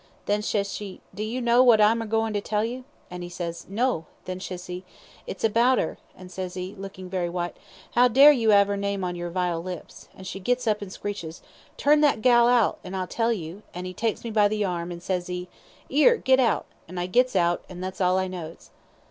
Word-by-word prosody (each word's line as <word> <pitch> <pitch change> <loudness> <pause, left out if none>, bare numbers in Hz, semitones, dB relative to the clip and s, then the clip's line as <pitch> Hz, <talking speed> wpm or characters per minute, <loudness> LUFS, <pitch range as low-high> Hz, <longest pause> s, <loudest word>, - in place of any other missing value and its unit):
Then 205 +1 +1
ses 200 -2 -1
she, 200 -3 -7
'Do 200 - -6
you 230 +4 -3
know 240 +1 +4
what 240 -4 +6
I'm 220 +2 +4
a 225 - -5
goin' 225 0 0
to 205 - -1
tell 210 +1 0
you?' 250 +2 -6 0.3
an' 180 0 -6
'e 175 - -6
says, 170 -1 -6
'No.' 205 -6 0 0.2
Then 185 0 -5
she 185 -1 -5
ses, 180 0 -7 0.5
'It's 195 - -7
about 235 +4 +4
'er;' 160 - -2 0.2
and 180 0 -12
ses 185 0 -5
'e, 185 +2 -5
lookin' 190 -1 -8
very 180 -2 -2
white, 175 0 -3 0.4
''Ow 245 0 +5
dare 275 +5 +9
you 230 -6 +3
'ave 200 0 +5
'er - - -2
name 200 -1 -2
on 180 -1 -2
your 175 0 -4
vile 175 -1 -1
lips?' 180 -1 -8
an' 190 - -11
she 190 +1 -6
gits 245 +6 0
up 210 -2 +1
an' 200 - -6
screeches, 185 -5 -6 0.3
'Turn 295 +1 +4
that 280 -7 +3
gal 240 -2 +6
out, 240 -3 +3
an' 185 +1 -7
I'll 185 -1 -1
tell 230 +5 0
you;' 180 -2 -5
an' 180 +1 -5
'e 185 - -5
takes 225 +3 -2
me 230 - -4
by 210 -1 +4
the 210 0 -1
arm, 175 -1 -3
an' 170 0 -7
ses 180 0 -2
'e, 180 0 -4 0.4
''Ere 305 - +5
git 260 -7 +3
out,' 240 -3 +2 0.2
an' 180 +2 -9
I 175 - -1
gits 250 +5 +2
out, 175 -1 +2
an' 180 -1 -9
that's 185 +1 -5
all 180 0 +3
I 190 0 0
knows." 170 -3 -8
195 Hz, 235 wpm, -25 LUFS, 180-230 Hz, 0.5 s, dare